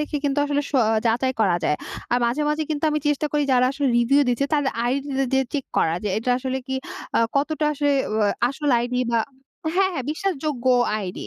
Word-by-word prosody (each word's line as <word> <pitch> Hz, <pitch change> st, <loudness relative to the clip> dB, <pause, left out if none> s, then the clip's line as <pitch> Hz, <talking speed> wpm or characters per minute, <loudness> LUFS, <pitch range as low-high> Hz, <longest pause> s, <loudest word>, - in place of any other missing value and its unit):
দেখে 300 Hz, 0 st, -2 dB
কিন্তু 285 Hz, 0 st, +1 dB
আসলে 290 Hz, 0 st, 0 dB
সও 265 Hz, -5 st, +3 dB, 0.2 s
যাচাই 245 Hz, +3 st, +1 dB
করা 185 Hz, -5 st, +3 dB
যায়। 150 Hz, -, +2 dB, 0.4 s
আর 245 Hz, -, +4 dB
মাঝে, 265 Hz, +6 st, 0 dB
মাঝে 305 Hz, +1 st, 0 dB
কিন্তু 300 Hz, +1 st, -1 dB
আমি 300 Hz, -, +1 dB
চেষ্টা 295 Hz, +1 st, +1 dB
করি 295 Hz, 0 st, +2 dB
যারা 250 Hz, 0 st, +4 dB
আসলে 280 Hz, -1 st, -1 dB
রিভিউ 275 Hz, +5 st, +4 dB
দিচ্ছে 245 Hz, +3 st, +1 dB
তাদের 290 Hz, -2 st, +1 dB, 0.2 s
আইডিটা 270 Hz, +1 st, -1 dB
দিয়ে 265 Hz, 0 st, +3 dB
চেক 280 Hz, -3 st, -2 dB
করা 160 Hz, -, +2 dB
যে -, -, 0 dB
এটা 245 Hz, +3 st, -2 dB
আসলে 260 Hz, 0 st, -2 dB
কি 265 Hz, -, -3 dB, 0.4 s
আ -, -, +4 dB, 0.2 s
কতটা 300 Hz, +2 st, 0 dB
আসলে 290 Hz, -1 st, +1 dB, 0.2 s
ও -, -, 0 dB, 0.3 s
আসল 290 Hz, +1 st, -2 dB
আইডি 250 Hz, +1 st, -1 dB
বা 230 Hz, -, +2 dB, 0.6 s
হ্যাঁ, 380 Hz, 0 st, +3 dB
হ্যাঁ 265 Hz, -7 st, -3 dB
বিশ্বাসযোগ্য 305 Hz, -7 st, -3 dB, 0.3 s
আইডি। 185 Hz, -3 st, -6 dB
275 Hz, 200 wpm, -23 LUFS, 250-295 Hz, 0.6 s, আর